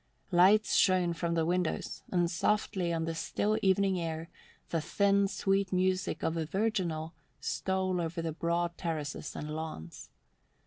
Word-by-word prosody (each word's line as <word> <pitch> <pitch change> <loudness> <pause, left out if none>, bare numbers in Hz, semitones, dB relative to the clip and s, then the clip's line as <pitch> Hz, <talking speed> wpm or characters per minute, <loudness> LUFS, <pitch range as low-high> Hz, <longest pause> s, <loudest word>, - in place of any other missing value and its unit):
Lights 190 +5 +5
shone 180 -2 +4
from 170 +1 -1
the 165 -1 +2
windows 180 0 -1
and 175 -2 +2
softly 185 0 0
on 165 -1 -1
the 165 - -2
still 210 +6 0
evening 190 -1 +3
air 165 -1 -4 0.4
the 165 - +1
thin, 200 +4 +2
sweet 195 0 0
music 185 0 0
of 160 - 0
a 165 -1 -1
virginal 180 -5 -1 0.3
stole 190 -1 -1
over 165 +1 -3
the 165 -1 -2
broad 170 +1 -1
terraces 155 -3 -4
and 150 +1 -5
lawns. 85 - -7
175 Hz, 145 wpm, -31 LUFS, 165-190 Hz, 0.4 s, Lights